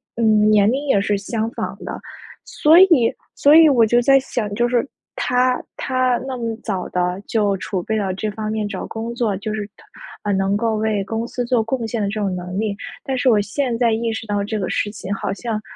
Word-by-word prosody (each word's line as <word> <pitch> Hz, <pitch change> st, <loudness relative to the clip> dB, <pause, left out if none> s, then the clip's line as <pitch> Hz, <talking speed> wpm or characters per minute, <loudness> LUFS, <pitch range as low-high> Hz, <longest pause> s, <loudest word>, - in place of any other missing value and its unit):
嗯， 215 Hz, -2 st, +3 dB
年 210 Hz, +1 st, +4 dB
龄 280 Hz, +3 st, -2 dB
也 200 Hz, -, +3 dB
是 205 Hz, 0 st, 0 dB
相 220 Hz, +2 st, -3 dB
仿 -, -, -5 dB
的。 -, -, -6 dB, 0.5 s
所 315 Hz, +3 st, +5 dB
以 330 Hz, -12 st, +5 dB, 0.2 s
所 290 Hz, +2 st, +5 dB
以 325 Hz, -1 st, +8 dB
我 250 Hz, -6 st, +5 dB
就 240 Hz, +2 st, +3 dB
在 270 Hz, +2 st, +5 dB
想， 225 Hz, -5 st, -3 dB
就 240 Hz, +2 st, +1 dB
是 245 Hz, +2 st, +1 dB, 0.3 s
他 250 Hz, 0 st, +1 dB
他 255 Hz, -1 st, 0 dB
那 265 Hz, -2 st, -4 dB
么 230 Hz, -1 st, -3 dB
早 190 Hz, -5 st, -3 dB
地 180 Hz, +1 st, -1 dB
就 205 Hz, -3 st, +1 dB
储 185 Hz, -1 st, -4 dB
备 220 Hz, +3 st, -1 dB
到 195 Hz, -3 st, -1 dB
这 210 Hz, +3 st, -3 dB
方 215 Hz, 0 st, -5 dB
面 215 Hz, -1 st, -2 dB
找 200 Hz, -2 st, -5 dB
工 225 Hz, +1 st, -5 dB
作 235 Hz, -4 st, -1 dB
就 215 Hz, +2 st, -4 dB
是 210 Hz, -1 st, -4 dB
他 -, -, -20 dB, 0.4 s
呃， 205 Hz, -, -1 dB
能 195 Hz, +1 st, +1 dB
够 225 Hz, +1 st, 0 dB
为 215 Hz, -2 st, 0 dB
公 225 Hz, +4 st, -3 dB
司 245 Hz, -, -3 dB
做 240 Hz, -1 st, +2 dB
贡 230 Hz, +2 st, -2 dB
献 225 Hz, 0 st, -3 dB
的 205 Hz, -, 0 dB
这 215 Hz, 0 st, -3 dB
种 195 Hz, -2 st, -1 dB
能 180 Hz, +1 st, -5 dB
力， 210 Hz, 0 st, -1 dB, 0.3 s
但 265 Hz, -1 st, -2 dB
是 255 Hz, +1 st, +3 dB
我 215 Hz, -3 st, +4 dB
现 230 Hz, +4 st, -2 dB
在 235 Hz, -2 st, +2 dB
意 225 Hz, +1 st, -1 dB
识 220 Hz, -, -5 dB
到 205 Hz, -1 st, -1 dB
这 215 Hz, +1 st, -3 dB
个 190 Hz, -3 st, -2 dB
事 205 Hz, -, -1 dB
情 200 Hz, -2 st, -5 dB
好 195 Hz, -1 st, -3 dB
像， 220 Hz, 0 st, -4 dB
220 Hz, 250 characters per minute, -20 LUFS, 205-240 Hz, 0.5 s, 以